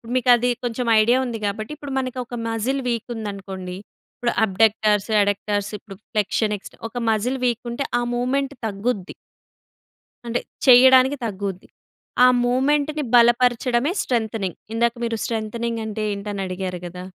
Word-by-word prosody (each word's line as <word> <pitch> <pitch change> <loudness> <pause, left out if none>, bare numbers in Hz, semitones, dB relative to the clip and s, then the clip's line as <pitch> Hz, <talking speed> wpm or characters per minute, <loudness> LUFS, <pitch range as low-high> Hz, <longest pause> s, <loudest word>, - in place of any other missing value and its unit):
మీకు 255 -1 +1
అది 245 +1 0 0.2
కొంచెం 240 0 -2
ఐడియా 235 +4 +4
ఉంది. 235 -3 -4
కాబట్టి 215 +5 -4
ఇప్పుడు 285 -2 -7
మనకి 255 -1 -4
ఒక 240 - -7
మజిల్ 245 +5 -1
వీక్ 235 -2 -2
ఉందనుకోండి, 195 -4 -6 0.4
ఇప్పుడు 240 -1 -1
అబ్‌డ‌క్ట‌ర్స్, 210 0 +2
అడక్టర్స్ 205 0 -1
ఇప్పుడు 200 -2 -12 0.2
ఫ్లెక్షన్ 210 0 0
ఎక్స్టె 195 - -14
ఒక 245 - -9
మజిల్ 245 +5 -1
వీక్ 240 -1 0
ఉంటే, 275 +4 -3
ఆ - - -1
మూవ్మెంట్ 270 +3 -1
తగ్గుద్ది. 200 -1 -3 1.1
అంటే 240 +1 -1 0.3
చేయడానికి 260 +2 +7
తగ్గుద్ది. 195 -3 -5 0.6
ఆ - - +8 0.2
మూవ్మెంట్‌ని 290 +4 +1
బలపరచడమే 240 +3 +3
స్ట్రెంతెనింగ్. 220 -6 -2 0.2
ఇందాక 235 0 +2
మీరు 230 -1 -2
స్ట్రెంతెనింగ్ 230 +1 -3
అంటే 215 0 -4
ఏంటి 200 +1 -6
అని 195 -1 -3
అడిగారు 185 -1 -4
గదా. 180 +1 -8
230 Hz, 140 wpm, -22 LUFS, 205-250 Hz, 1.1 s, ఆ